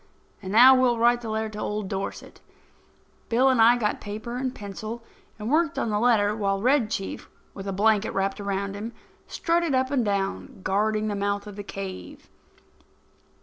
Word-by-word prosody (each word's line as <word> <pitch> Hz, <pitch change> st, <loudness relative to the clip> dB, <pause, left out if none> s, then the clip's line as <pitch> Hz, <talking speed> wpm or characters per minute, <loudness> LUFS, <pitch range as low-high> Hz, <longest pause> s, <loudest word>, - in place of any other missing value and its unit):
And 190 Hz, -1 st, -6 dB
now 245 Hz, +5 st, +8 dB
we'll 255 Hz, -2 st, +3 dB
write 240 Hz, +1 st, +3 dB
the 230 Hz, -, -6 dB
letter 220 Hz, 0 st, -2 dB
to 215 Hz, 0 st, -8 dB
old 210 Hz, -1 st, -3 dB
Dorset." 195 Hz, 0 st, -6 dB, 0.9 s
Bill 250 Hz, +3 st, +4 dB
and 255 Hz, -3 st, +3 dB
I 235 Hz, +2 st, +6 dB
got 210 Hz, -3 st, -1 dB
paper 215 Hz, +3 st, -6 dB
and 260 Hz, 0 st, -2 dB
pencil 215 Hz, +3 st, -7 dB, 0.3 s
and 220 Hz, +3 st, -4 dB
worked 320 Hz, 0 st, +2 dB
on 225 Hz, -, -1 dB
the 210 Hz, -, +1 dB
letter 210 Hz, -3 st, +3 dB
while 195 Hz, -2 st, 0 dB
Red 250 Hz, 0 st, +2 dB
Chief, 195 Hz, -3 st, -5 dB, 0.2 s
with 195 Hz, 0 st, -8 dB
a -, -, -1 dB
blanket 210 Hz, +2 st, +2 dB
wrapped 195 Hz, +1 st, -2 dB
around 200 Hz, 0 st, -2 dB
him, 215 Hz, +4 st, -6 dB, 0.3 s
strutted 335 Hz, -4 st, 0 dB
up 260 Hz, +1 st, +1 dB
and 265 Hz, -4 st, +2 dB
down, 200 Hz, -1 st, -3 dB
guarding 215 Hz, +2 st, 0 dB
the 210 Hz, -, -1 dB
mouth 200 Hz, 0 st, -1 dB
of 205 Hz, -1 st, -9 dB
the 205 Hz, -, -6 dB
cave. 195 Hz, -1 st, -8 dB
215 Hz, 180 wpm, -25 LUFS, 200-240 Hz, 0.9 s, now